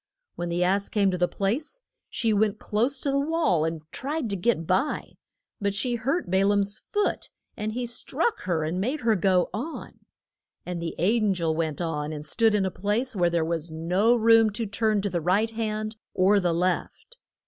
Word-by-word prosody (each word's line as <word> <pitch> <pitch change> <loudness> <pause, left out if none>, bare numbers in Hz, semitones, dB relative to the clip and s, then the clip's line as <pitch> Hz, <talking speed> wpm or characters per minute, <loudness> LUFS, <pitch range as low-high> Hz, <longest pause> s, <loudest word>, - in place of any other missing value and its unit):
When 175 0 -4
the 175 +1 +1
ass 195 +2 +1
came 200 -3 +2
to 180 - -2
the 180 - +3
place 270 - -2 0.3
she 225 -2 0
went 210 0 +2
close 240 +8 0
to 280 - 0
the 275 - +2
wall 285 - +1
and 160 -1 -3
tried 280 -4 -3
to - - 0
get 180 -3 0
by. 185 - 0 0.5
But 200 -2 -1
she 245 +5 0
hurt 250 - -1
Ba 190 +1 +3
laam's 200 +1 +1
foot 415 0 -2 0.3
and 215 +1 -3
he 245 +1 -2
struck 245 - -1
her 170 -4 0
and 170 +4 -2
made 265 +9 -1
her 225 -2 +3
go 185 -1 +2
on. 265 - -6 0.7
And 175 -1 -4
the 165 -1 -4
an 210 +2 +2
gel 165 -2 0
went 160 0 -2
on 150 -3 -2
and 150 -1 -6
stood 220 +6 +2
in 200 -2 +2
a 190 - -1
place 215 +7 -1
where 175 -2 +3
there 170 -1 +1
was 165 0 -2
no 180 +9 +2
room 225 -1 +5
to 225 +2 -2
turn 210 0 0
to 200 - 0
the 170 -1 -1
right 200 +7 +2
hand 215 -1 -3 0.2
or 195 +2 +4
the 180 -3 +1
left. 180 - -2
200 Hz, 200 wpm, -26 LUFS, 175-230 Hz, 0.7 s, room